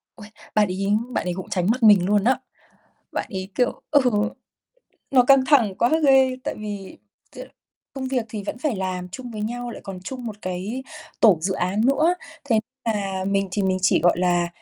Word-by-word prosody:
Uầy, 210 -2 -12 0.3
bạn 210 -2 +4
ấy 190 +2 -3 0.2
bạn 240 - -2
ấy 180 - -1
cũng 185 +1 -7
tránh 180 -1 0
mặt 250 +1 -2
mình 205 -5 +7
luôn 205 +1 +2
đó. 260 +3 +2 0.7
Bạn - - -2
ấy, 190 0 -4
kiểu 245 -1 0
ừ, 290 - +5 1.1
nó 260 -2 +6
căng 270 0 +5
thẳng 245 -9 +4
quá 235 - +3 0.2
ghê, 265 -1 +5
tại - - -2
vì 205 -2 -7 0.4
t - - -10 0.6
công 265 -1 -4
việc 250 -4 -1
thì 215 -2 -5
vẫn 235 - -4
phải 255 -5 -1
làm 185 -1 -3
chung 245 +6 -8
với 215 -2 -6
nhau, 240 +2 -4
lại - - -8
còn 195 -3 -7
chung 245 +6 -7
một 215 - -5
cái 185 +8 -4 0.4
tổ 205 -7 +6
dự 190 +3 -1
án 185 +3 -1
nữa. 310 +6 +3 0.3
Thế 230 -6 +2 0.2
là 195 -4 -2
mình 195 0 0
thì 200 +1 0
mình 185 -1 +1
chỉ, 190 - +4
gọi 175 0 +3
là, 175 -1 +2
210 Hz, 200 wpm, -23 LUFS, 185-245 Hz, 1.1 s, mình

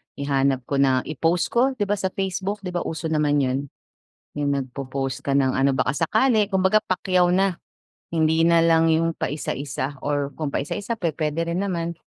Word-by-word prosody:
Ihanap 135 -2 0
ko 140 - -1
na, 130 -2 +3
i-post 165 +3 0
ko 260 +3 +2
'di 220 - -1
ba 205 0 -1
sa 190 - 0
Facebook? 195 +2 -3
'Di 180 - -4
ba 175 - -1
uso 160 0 -4
naman 150 -2 +2
'yon? 130 +2 -1 0.7
Yung 145 -1 0
nagpo-post 135 0 -3
ka 140 - -1
ng 135 -1 +2
ano 135 +1 +3
baka 130 0 0
sakali 215 - +2
kumbaga 190 +3 +3
pakyaw 185 -1 +1
na. 190 -1 +2 0.6
Hindi 160 0 +2
na 170 0 +5
lang 165 0 +4
yung 165 +1 +1
paisa-isa 140 -1 -3
or 145 -1 0
kung 150 -3 -3
paisa-isa 210 +9 -3
pu-puwede 165 0 -1
rin 175 +4 -1
naman. 170 -3 -3
165 Hz, 175 wpm, -23 LUFS, 140-185 Hz, 0.7 s, na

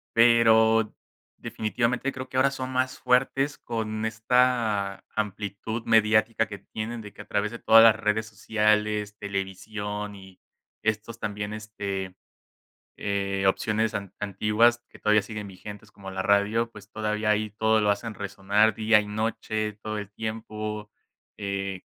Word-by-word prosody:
Pero, 115 -2 +5 0.4
definitivamente 120 +4 -1
creo, 130 0 -7
que 130 - -4
ahora 135 +1 +5
son 130 -1 -5
más 130 0 0
fuertes 135 +3 +2
con 110 -2 -3
esta 110 -3 +1
amplitud 105 +2 -3
mediática 110 0 +3
que 105 - -7
tienen, 115 +2 -6
de 105 -2 -10
que, - - -10
a - - -11
través 105 +1 0
de 120 - -7
todas 115 0 +7
las 115 -1 +7
redes 105 +1 0
sociales, 105 0 0
televisión 100 +1 -4
y 95 -1 -14 0.4
estos 110 +1 -2
también, 105 0 -4
este, 100 -3 -5 0.8
eh, 100 -1 -1
opciones 110 +3 +1
an 100 -2 -4
antiguas 105 +4 +2
que - - -16
todavía 105 0 +3
siguen 105 0 -6
vigentes 105 +2 -10
como 95 -1 -9
la 95 0 -3
radio, 100 +4 +2
pues 105 -1 -14
todavía 105 0 -1
ahí 105 0 +1
todo 110 +1 +2
lo 105 -1 +3
hacen 105 +2 -2
resonar 100 +2 +1
día 110 0 +4
y 105 - -6
noche, 110 0 -2
todo 110 +1 -5
el 105 -1 -6
tiempo, 110 -1 -5 0.5
eh, 100 -2 -3
105 Hz, 145 wpm, -26 LUFS, 105-110 Hz, 0.8 s, todas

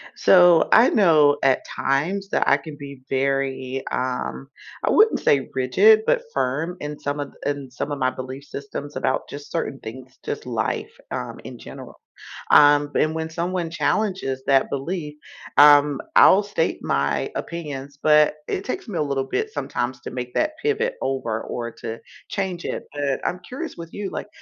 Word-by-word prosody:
So, 175 -3 +5
I 230 +3 +7
know 155 -8 +4
at 135 -1 +2
times 180 +9 -1
that - - 0
I - - +5
can 155 -3 -10
be 140 -2 -9
very, 135 -1 -1
um, 130 +1 -3 0.4
I - - +2
wouldn't 435 +1 +4
say 135 -2 +2
rigid, 195 - +5
but - - +2
firm 160 +8 -1
in 150 0 -6
some 145 +1 -3
of 145 -1 -5
in 140 -2 -3
some 135 +4 -4
of 145 - -2
my 130 -1 +1
belief 130 +2 -7
systems 140 +1 -7
about 130 - -1
just 145 0 -9
certain 150 -5 -3
things, 130 +3 -10
just 440 0 -5
life, - - -2 0.2
um, - - -5
in - - -9
general. - - -11 0.5
Um, 145 0 +6
and 155 +1 +1
when 160 0 -3
someone 170 +1 -2
challenges 175 -7 -1
that 135 -1 +3
belief, 150 +2 -4 0.4
um, 145 -1 +7 0.2
I'll 195 - +7
state 200 -5 -1
my 70 0 0
opinions, 145 -4 -6
but 150 -1 +5 0.2
it 190 - -2
takes 255 - -5
me 200 - -5
a - - +1
little 140 -2 -1
bit 440 0 -2
sometimes 120 - -3
to - - -7
make 125 0 -6
that 310 - +1
pivot 445 +3 0
over 120 -5 -2
or 120 -1 -5
to 115 0 -5 0.3
change 185 -3 -3
it. - - -4
But 140 -2 -1
I'm 180 - -5
curious 320 +6 -6
with 165 -1 -9
you. 205 -1 -4
Like, - - -6
145 Hz, 170 wpm, -23 LUFS, 135-180 Hz, 0.5 s, I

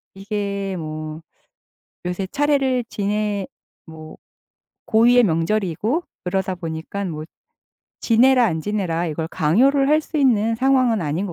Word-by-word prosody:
이게 200 -1 -3
뭐 155 -1 -6 0.9
요새 180 +2 -2
차례를 275 -4 +1
지내 205 -1 -2 0.4
뭐 160 -1 -11 0.7
고유의 240 +2 +5
명절이고 205 - 0 0.2
그러다 190 +1 -1
보니까 165 +3 -5
뭐 155 -3 -5 0.8
지내라 250 +2 +4
안 160 -6 -1
지내라 175 -3 -2
이걸 160 +1 -4
강요를 265 - +2
할 305 +1 +4
수 315 - -6
있는 230 -5 +3
상황은 255 -3 +2
아닌 160 +6 -2
것 180 - -6
200 Hz, 250 characters per minute, -21 LUFS, 165-245 Hz, 0.9 s, 고유의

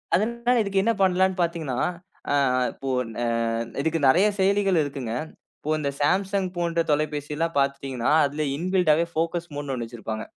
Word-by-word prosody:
அதனால 235 +4 +1
இதுக்கு 200 -2 +1
என்ன 230 +2 +2
பண்ணலாம்ன்னு 190 0 +2
பார்த்தீங்கனா, 165 -7 -1 0.5
அ, - - +2 0.4
இப்போ 135 - -6 0.2
ந - - -10 0.6
இதுக்கு 160 +2 0
நெறைய 180 +10 +5
செயலிகள் 195 -3 +3
இருக்குங்க. 135 -5 -4 0.5
இப்போ 155 - -3
இந்த 140 -2 -1
Samsung 195 +5 +1
போன்ற 170 -1 +1
தொலைபேசில்லாம் 150 +2 -1
பார்த்துட்டீங்கனா, 135 -3 -1
அதில 145 +2 -2
இன்பில்ட்டாவே 170 -2 +2
ஃபோகஸ் 170 +1 -2
மோட்ன்னு 145 -1 -4
ஒன்னு 120 -2 -4
வச்சிருப்பாங்க. 110 -1 -6
165 Hz, 140 wpm, -25 LUFS, 140-190 Hz, 0.6 s, நெறைய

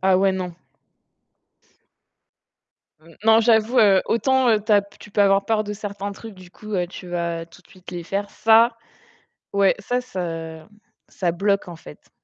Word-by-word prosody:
Ah 190 0 +3
ouais 190 0 +2
non. 180 -2 -4 2.5
N 165 0 -19
non, 225 0 +6
j'avoue, 225 +1 +3
heu, 200 -4 +5
autant, 265 +2 +2
heu, 215 -2 +3
tu 215 - +1
as 205 -1 +5
p 200 - -20
tu 210 - -14
peux 205 - +2
avoir 195 0 +3
peur 215 0 0
de 210 - -5
certains 200 -1 -6
trucs, 220 +1 -11
du 185 -1 -15
coup, 215 +3 -8
heu, 180 -2 0
tu 180 0 -11
vas 170 -1 -3
tout 175 +2 -19
de - - -27
suite 185 -1 -14
les 175 -1 -6
faire. 200 +3 -3
Ça, 230 +1 +4 0.8
ouais, 200 -1 +3
ça, 245 +5 -2
ça 165 -7 -6 0.4
ça 175 -3 -2
bloque, 200 +2 0
en 175 - -8
fait. 75 - -15
200 Hz, 180 wpm, -22 LUFS, 180-215 Hz, 2.5 s, non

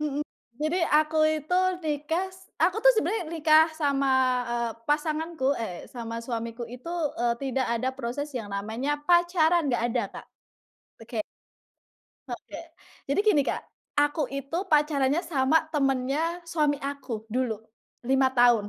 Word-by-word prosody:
mhm. 295 -1 -1 0.4
Jadi, 310 +4 +1
aku 310 +1 +4 0.2
itu 360 +5 -1 0.2
nikas 335 +5 -3
aku 370 - +3
tu - - +10
sebenarnya 435 -3 0
nikah 315 -1 +5
sama, 280 -3 +1 0.4
eee, 235 -1 -1
pasanganku 305 -1 0
eh, 190 -7 -5
sama 230 -1 -5
suamiku 230 0 -5
itu, 250 +8 -8 0.3
eee, 235 0 +1
tidak 265 -1 0 0.2
ada 255 - 0
proses 270 +4 -3
yang 210 -4 -5
namanya 225 +9 -2
pacaran 345 -2 +4
nggak 235 - +1
ada, 230 - 0 0.2
Kak. - - -19 0.8
Oke. 225 -1 -3 1.1
Oke. - - -7 0.5
Jadi 280 +7 +1
gini, 415 -9 +4
Kak, - - -1 0.4
aku 290 +2 +1
itu, 275 +3 -4 0.2
pacarannya 295 0 +3
sama 310 -3 +2
temennya 280 +4 0
suami 300 -3 +2
aku, 280 -2 -5 0.2
dulu. 250 -2 +1 0.6
5 265 0 +4
tahun. 240 -3 +5
285 Hz, 130 wpm, -27 LUFS, 250-320 Hz, 1.1 s, tu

